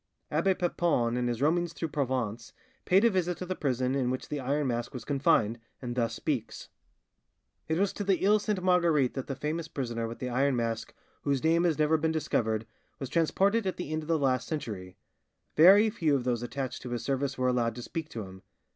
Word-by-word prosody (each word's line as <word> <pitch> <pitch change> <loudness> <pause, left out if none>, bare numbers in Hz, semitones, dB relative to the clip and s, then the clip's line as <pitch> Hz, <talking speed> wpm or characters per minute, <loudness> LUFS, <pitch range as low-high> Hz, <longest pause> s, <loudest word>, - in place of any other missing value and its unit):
Abbe 190 -1 +2
Papon, 170 -10 +1
in 125 0 0
his 120 +2 -1
roamings 170 +2 +1
through 165 - -4
Provence, 125 -6 -2 0.3
paid 195 +5 +4
a - - +7
visit 180 -2 0
to 185 - -5
the 185 - -2
prison 130 -4 0
in 130 -3 0
which 130 0 -4
the 150 - -2
Iron 140 +3 0
Mask 120 0 -2
was 120 - -6
confined, 135 -6 +2 0.2
and 120 -2 -4
thus 115 -2 0
speaks:— 135 -6 -3 1.0
"It 160 - 0
was 195 +1 +1
to 205 - -4
the 195 -1 +1
Iles 210 +1 +4
Sainte 200 -4 -1
Marguerite 170 -8 +3
that 135 - -5
the 135 - -3
famous 155 +4 -3
prisoner 115 -6 -3
with 115 - -7
the 125 - -4
iron 130 +2 +1
mask 115 -1 -2 0.3
whose 140 -2 0
name 165 +2 +3
has 165 -4 +2
never 155 +1 +3
been 160 +1 0
discovered, 110 -8 0 0.3
was 135 - -5
transported 195 +6 +2
at 185 - -2
the 175 -4 -5
end 155 0 -1
of 155 - -10
the 165 -1 +2
last 130 -3 +1
century; 100 - -5 0.6
very 200 +7 +7
few 155 -7 +1
of 130 - -1
those 120 -2 0
attached 130 +1 -4
to 125 - -7
his 120 -1 -3
service 135 0 -1
were 130 0 +1
allowed 120 -2 0
to 120 - -7
speak 160 +3 -5
to 115 -7 -5
him. 95 0 -11
140 Hz, 215 wpm, -29 LUFS, 120-165 Hz, 1.0 s, a